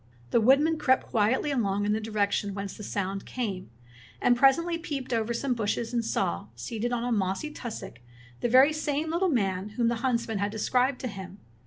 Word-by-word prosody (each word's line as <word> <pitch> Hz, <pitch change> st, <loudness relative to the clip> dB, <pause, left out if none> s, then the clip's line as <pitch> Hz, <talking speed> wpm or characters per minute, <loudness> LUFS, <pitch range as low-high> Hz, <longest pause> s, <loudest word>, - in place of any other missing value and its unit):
The 235 Hz, -, +4 dB
woodman 290 Hz, +7 st, +4 dB
crept 260 Hz, -3 st, +3 dB
quietly 230 Hz, +6 st, +2 dB
along 205 Hz, -6 st, 0 dB
in 210 Hz, -, +2 dB
the 220 Hz, -, -1 dB
direction 205 Hz, -2 st, -1 dB
whence 195 Hz, -1 st, -5 dB
the -, -, -10 dB
sound 195 Hz, -1 st, -3 dB
came, 200 Hz, -, -4 dB, 0.5 s
and 245 Hz, -, +4 dB
presently 335 Hz, +7 st, +3 dB
peeped 280 Hz, -6 st, -4 dB
over 225 Hz, 0 st, 0 dB
some 250 Hz, +3 st, 0 dB
bushes 225 Hz, +1 st, -2 dB
and 235 Hz, -1 st, +1 dB
saw, 85 Hz, -, -1 dB
seated 220 Hz, -, -3 dB
on 240 Hz, -1 st, -1 dB
a 245 Hz, -, -1 dB
mossy 200 Hz, +7 st, -1 dB
tussock, 235 Hz, -, -7 dB, 0.4 s
the 240 Hz, -, 0 dB
very 265 Hz, +5 st, +6 dB
same 305 Hz, +1 st, -1 dB
little 360 Hz, +3 st, +1 dB
man 195 Hz, -, 0 dB
whom 235 Hz, -1 st, +3 dB
the 235 Hz, -, 0 dB
huntsman 235 Hz, -4 st, 0 dB
had 200 Hz, +1 st, 0 dB
described 250 Hz, +5 st, +1 dB
to 255 Hz, -, -2 dB
him. 195 Hz, -3 st, -8 dB
235 Hz, 190 wpm, -28 LUFS, 205-265 Hz, 0.5 s, very